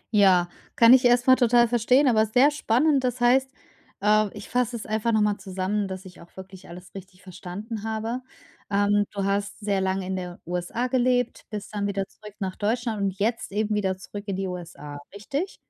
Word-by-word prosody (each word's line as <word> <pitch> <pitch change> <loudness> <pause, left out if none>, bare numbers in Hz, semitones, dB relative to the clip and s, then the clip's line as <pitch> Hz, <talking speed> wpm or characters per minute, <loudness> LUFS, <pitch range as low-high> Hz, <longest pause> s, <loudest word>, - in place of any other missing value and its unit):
Ja, 185 -3 +5 0.3
kann 230 +1 +7
ich 255 -1 +5
erstmal 245 +2 +5
total 240 -1 +4
verstehen, 250 +4 +3
aber 220 -3 +3
sehr 255 +7 +4
spannend, 280 +1 +2
das 250 0 -1
heißt, 260 +2 +3 0.5
äh 215 0 +4
ich 205 - -9
fasse 245 -1 0
es 220 - -6
einfach 220 +2 -1
nochmal 210 -2 +2
zusammen, 195 +1 -2
dass 190 0 -7
ich 180 - -13
auch 170 - -18
wirklich 190 0 -11
alles 180 +2 -12
richtig 190 -1 -12
verstanden 195 +4 -7
habe. 225 +3 -3 0.5
Ähm, 205 0 +2
du 200 -1 -3
hast 200 +2 -2
sehr 200 -2 -1
lange 190 0 -1
in 190 0 -3
der 180 -1 -6
USA 180 +8 -3
gelebt, 250 -1 0
bist 210 -1 -7
dann 205 -1 -1
wieder 195 -1 -2
zurück 210 -1 -14
nach 190 -2 -4
Deutschland 220 0 -1
und 195 -1 -1
jetzt 225 +1 -1
eben 210 +1 -1
wieder 190 -3 0
zurück 205 +2 -9
in 195 - -2
die 195 0 -3
USA, 165 -5 -8 0.2
richtig? 285 - -4
210 Hz, 190 wpm, -25 LUFS, 190-240 Hz, 0.5 s, kann